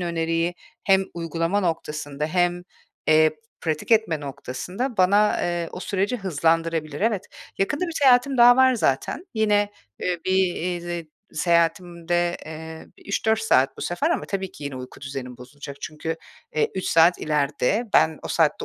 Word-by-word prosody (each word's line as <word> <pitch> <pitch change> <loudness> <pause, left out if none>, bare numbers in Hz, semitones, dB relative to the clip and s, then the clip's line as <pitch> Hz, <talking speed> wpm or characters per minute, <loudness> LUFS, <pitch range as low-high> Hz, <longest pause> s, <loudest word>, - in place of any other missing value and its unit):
öneriyi 165 0 -1 0.3
hem 190 -1 +4
uygulama 165 +3 -1
noktasında 150 -4 -3
hem, 175 +1 +1 0.5
eee, 155 0 +6 0.3
pratik 155 +3 -3
etme 215 -9 +3
noktasında 180 - -5
bana, 200 +3 +4
eee, 175 -1 -1
o 180 - -7
süreci 200 +6 -1
hızlandırabilir. 165 -4 0
Evet, 215 -2 +1 0.4
yakında 290 - 0
bir 335 - -5
seyahatim 260 0 +5
daha 245 +1 +8
var 260 -1 +5
zaten. 215 - -1
Yine, 210 -2 +2 0.3
eee, 180 -1 -1
bir 175 -2 -1 0.2
seyahatimde, 170 0 +1
eee, 160 +1 -8
bir - - -20
3-4 220 +2 +1
saat 135 -12 +2
bu - - -10
sefer 285 - 0
ama - - 0
tabii 190 -2 -4
ki 145 - -10
yine 140 -2 -5
uyku 130 0 -9
düzenim 130 -2 -6
bozulacak. 140 +2 -10
Çünkü, 160 +1 -4 0.4
eee, 155 - +1
3 190 - -3
saat 170 +2 +5
ileride. 150 - 0
Ben 160 -1 +4
o - - -6
saatte 160 -3 +1
175 Hz, 150 wpm, -24 LUFS, 155-195 Hz, 0.5 s, daha